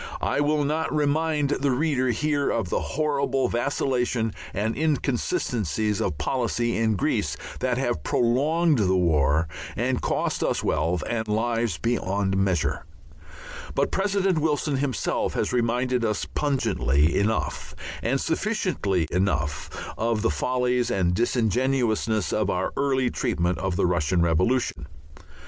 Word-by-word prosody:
I -, -, 0 dB
will 145 Hz, 0 st, +2 dB
not 155 Hz, +3 st, -1 dB
remind 150 Hz, 0 st, +1 dB
the 140 Hz, 0 st, +1 dB
reader 130 Hz, -1 st, +1 dB
here 145 Hz, +4 st, 0 dB
of 110 Hz, -6 st, -1 dB
the -, -, +1 dB
horrible 140 Hz, -3 st, 0 dB
vacillations 120 Hz, -3 st, 0 dB, 0.2 s
and 110 Hz, +3 st, -1 dB
inconsistencies 115 Hz, -, 0 dB
of 75 Hz, -, -1 dB
policy 120 Hz, -, -1 dB
in 110 Hz, -1 st, +1 dB
Greece 95 Hz, -, 0 dB, 0.2 s
that 125 Hz, -1 st, 0 dB
have 120 Hz, -, -1 dB
prolonged 145 Hz, -, +2 dB
the 95 Hz, -3 st, +2 dB
war 80 Hz, -2 st, +2 dB, 0.3 s
and -, -, 0 dB
cost -, -, -1 dB
us -, -, 0 dB
wealth 80 Hz, +2 st, 0 dB
and 110 Hz, -2 st, -2 dB
lives 115 Hz, -3 st, 0 dB
beyond 95 Hz, 0 st, 0 dB
measure, 95 Hz, -4 st, 0 dB, 0.9 s
but -, -, +1 dB
President 195 Hz, -3 st, +1 dB
Wilson 150 Hz, -2 st, 0 dB
himself 130 Hz, -5 st, -1 dB
has -, -, -1 dB
reminded 125 Hz, +1 st, +1 dB
us 110 Hz, -2 st, 0 dB
pungently 90 Hz, -, +1 dB
enough 110 Hz, +2 st, -1 dB, 0.3 s
and 135 Hz, +4 st, 0 dB
sufficiently 160 Hz, -, 0 dB
enough 75 Hz, -7 st, 0 dB, 0.3 s
of 115 Hz, -1 st, 0 dB
the 115 Hz, -, +2 dB
follies 125 Hz, +8 st, 0 dB
and 90 Hz, -2 st, +1 dB
disingenuousness 115 Hz, -1 st, +1 dB
of 105 Hz, -2 st, +1 dB
our 90 Hz, -1 st, -1 dB
early 130 Hz, -3 st, +1 dB
treatment 90 Hz, -8 st, -1 dB
of 95 Hz, 0 st, -1 dB
the -, -, +2 dB
Russian 85 Hz, 0 st, +1 dB
Revolution. 85 Hz, -, +1 dB
120 Hz, 130 wpm, -25 LUFS, 95-140 Hz, 0.9 s, will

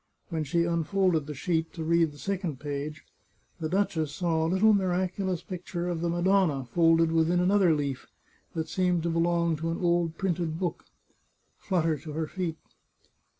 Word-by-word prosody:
When 160 Hz, -3 st, -2 dB
she 170 Hz, +4 st, +1 dB
unfolded 170 Hz, -1 st, +1 dB
the 150 Hz, -, -5 dB
sheet, 160 Hz, +3 st, -1 dB
to 165 Hz, -, -5 dB
read 165 Hz, -1 st, +3 dB
the 145 Hz, -, -14 dB
second 180 Hz, -6 st, -3 dB
page, 145 Hz, +1 st, -5 dB, 0.5 s
the 160 Hz, -1 st, -2 dB
duchess 165 Hz, -5 st, 0 dB
saw 165 Hz, 0 st, 0 dB
a 160 Hz, -, +1 dB
little 205 Hz, +4 st, +4 dB
miraculous 185 Hz, -1 st, 0 dB
picture 175 Hz, -1 st, -5 dB
of 170 Hz, -2 st, -2 dB
the 170 Hz, -, 0 dB
Madonna 175 Hz, -5 st, +2 dB
folded 165 Hz, +5 st, +3 dB
within 165 Hz, +2 st, +2 dB
another 180 Hz, -2 st, +4 dB
leaf, 140 Hz, -3 st, -3 dB, 0.5 s
that 160 Hz, -1 st, -2 dB
seemed 180 Hz, -3 st, +1 dB
to 170 Hz, -, 0 dB
belong 170 Hz, -1 st, +1 dB
to 165 Hz, +2 st, -3 dB
an 165 Hz, -, -2 dB
old 170 Hz, -2 st, +1 dB
printed 170 Hz, -4 st, -1 dB
book, 175 Hz, -2 st, -3 dB, 0.7 s
flutter 165 Hz, -5 st, 0 dB
to 155 Hz, +1 st, -8 dB
her. 160 Hz, +1 st, -1 dB
feet. 170 Hz, -1 st, -4 dB
170 Hz, 165 wpm, -28 LUFS, 160-180 Hz, 0.7 s, little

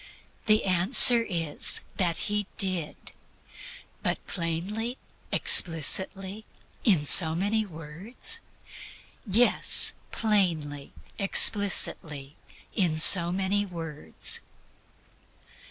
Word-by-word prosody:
The 215 Hz, 0 st, 0 dB
answer 195 Hz, +6 st, +5 dB
is 165 Hz, -9 st, 0 dB, 0.2 s
that 175 Hz, -4 st, -4 dB
He 210 Hz, -1 st, -5 dB
did. 185 Hz, -6 st, -5 dB, 0.9 s
But -, -, -4 dB
plainly, 195 Hz, +9 st, -8 dB, 0.3 s
explicitly, 190 Hz, +5 st, 0 dB, 0.4 s
in 205 Hz, -7 st, +1 dB
so 160 Hz, +1 st, +6 dB
many 205 Hz, +4 st, -4 dB
words? 185 Hz, -, -6 dB, 0.9 s
Yes, 225 Hz, +5 st, +1 dB, 0.2 s
plainly, 165 Hz, -10 st, -5 dB, 0.3 s
explicitly, 170 Hz, -8 st, +1 dB, 0.4 s
in 175 Hz, -5 st, -3 dB
so 170 Hz, +2 st, +7 dB
many 195 Hz, +2 st, -4 dB
words. 165 Hz, -6 st, -4 dB
185 Hz, 75 wpm, -23 LUFS, 165-210 Hz, 0.9 s, so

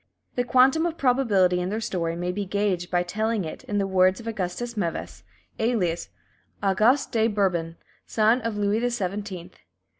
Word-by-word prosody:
The 245 Hz, -, 0 dB
quantum 260 Hz, +6 st, +4 dB
of 335 Hz, -1 st, -5 dB
probability 215 Hz, -9 st, +3 dB
in 180 Hz, -, -2 dB
their 215 Hz, +2 st, -2 dB
story 170 Hz, -6 st, -2 dB
may 175 Hz, +1 st, -2 dB
be 200 Hz, +3 st, -3 dB
gauged 190 Hz, -2 st, -1 dB
by 175 Hz, -1 st, +1 dB
telling 215 Hz, +2 st, -1 dB
it 155 Hz, -, -7 dB
in 205 Hz, -, -2 dB
the 200 Hz, -, +1 dB
words 185 Hz, 0 st, +3 dB
of 230 Hz, -, -10 dB
Augustus 225 Hz, +2 st, -3 dB
Meves, 175 Hz, -6 st, -3 dB, 0.4 s
alias 205 Hz, -8 st, 0 dB, 0.5 s
"Auguste 215 Hz, +8 st, +3 dB
de 225 Hz, -2 st, +2 dB
Bourbon, 180 Hz, -6 st, 0 dB, 0.3 s
son 225 Hz, +3 st, +3 dB
of 225 Hz, -2 st, -3 dB
Louis 205 Hz, +1 st, +1 dB
the 245 Hz, +1 st, +1 dB
Seventeenth." 195 Hz, -4 st, -5 dB
205 Hz, 170 wpm, -25 LUFS, 180-230 Hz, 0.5 s, quantum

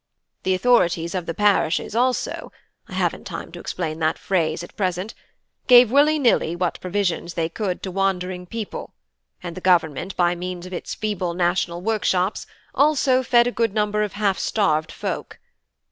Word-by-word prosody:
The 185 Hz, 0 st, +1 dB
authorities 175 Hz, -7 st, +2 dB
of 180 Hz, -3 st, -3 dB
the 165 Hz, -, -3 dB
parishes 205 Hz, -1 st, +1 dB
also 250 Hz, +2 st, 0 dB, 0.4 s
(I -, -, -11 dB
haven't -, -, -1 dB
time -, -, -7 dB
to -, -, -9 dB
explain 155 Hz, 0 st, -4 dB
that 160 Hz, -1 st, +1 dB
phrase 165 Hz, -4 st, -1 dB
at -, -, -12 dB
present) 185 Hz, +1 st, -2 dB, 0.5 s
gave 245 Hz, -2 st, +8 dB
willy 295 Hz, +3 st, +4 dB
nilly 235 Hz, -, +2 dB
what 175 Hz, -1 st, -2 dB
provisions 180 Hz, -3 st, -2 dB
they 165 Hz, -1 st, -1 dB
could 185 Hz, 0 st, -3 dB
to 190 Hz, -, -4 dB
wandering 185 Hz, -1 st, -1 dB
people; 225 Hz, +1 st, -6 dB, 0.5 s
and 170 Hz, -, -6 dB
the 185 Hz, -, -7 dB
Government, 175 Hz, -1 st, +1 dB
by 175 Hz, -1 st, +3 dB
means 180 Hz, 0 st, -6 dB
of 185 Hz, -, -9 dB
its 175 Hz, -, -5 dB
feeble 190 Hz, -5 st, -2 dB
national 175 Hz, -1 st, 0 dB
workshops, 205 Hz, -3 st, 0 dB, 0.3 s
also 280 Hz, -3 st, +3 dB
fed 240 Hz, -1 st, +4 dB
a 245 Hz, -, 0 dB
good 230 Hz, -3 st, -1 dB
number 210 Hz, 0 st, +1 dB
of 210 Hz, -2 st, -2 dB
half 205 Hz, -2 st, 0 dB
starved 160 Hz, -7 st, +1 dB
folk. -, -, -5 dB
185 Hz, 165 wpm, -22 LUFS, 175-215 Hz, 0.5 s, gave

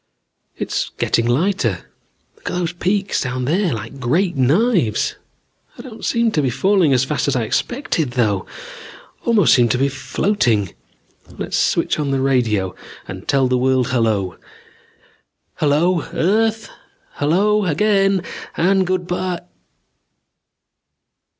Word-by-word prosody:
"It's -, -, -2 dB
getting 115 Hz, 0 st, +1 dB
lighter. 130 Hz, -, 0 dB, 0.5 s
Look -, -, -7 dB
at -, -, -3 dB
those 170 Hz, -1 st, -2 dB
peaks 195 Hz, +3 st, -1 dB
down 125 Hz, -1 st, -2 dB
there! 175 Hz, +5 st, +1 dB
Like 125 Hz, +4 st, -6 dB
great 170 Hz, +9 st, +1 dB
knives. 145 Hz, -, +2 dB, 0.6 s
I -, -, -9 dB
don't 230 Hz, -4 st, -11 dB
seem 235 Hz, -1 st, +1 dB
to 150 Hz, -, +1 dB
be 135 Hz, -, +1 dB
falling 185 Hz, -, +2 dB
as 130 Hz, -1 st, +3 dB
fast 150 Hz, +1 st, -1 dB
as 140 Hz, -, +1 dB
I 120 Hz, -, +1 dB
expected 160 Hz, -, -1 dB
though. 105 Hz, -7 st, 0 dB, 0.8 s
Almost 220 Hz, -7 st, +4 dB
seem 120 Hz, -2 st, +4 dB
to 125 Hz, -, +1 dB
be 135 Hz, +2 st, +1 dB
floating. 130 Hz, -, 0 dB, 0.6 s
Let's -, -, -4 dB
switch -, -, +1 dB
on 145 Hz, -2 st, -1 dB
the 135 Hz, -1 st, 0 dB
radio 115 Hz, -8 st, +1 dB, 0.3 s
and 95 Hz, 0 st, -8 dB
tell 135 Hz, -2 st, +2 dB
the 125 Hz, 0 st, +1 dB
world 130 Hz, 0 st, +1 dB
hello. 110 Hz, -7 st, 0 dB, 1.2 s
Hello, 160 Hz, +4 st, +2 dB
earth... 220 Hz, +6 st, +1 dB, 0.5 s
hello, 200 Hz, +8 st, +2 dB
again... 195 Hz, +2 st, +2 dB, 0.3 s
and 190 Hz, +2 st, +2 dB
good 185 Hz, -1 st, -1 dB
by 180 Hz, 0 st, -3 dB
150 Hz, 130 wpm, -19 LUFS, 125-190 Hz, 1.2 s, Almost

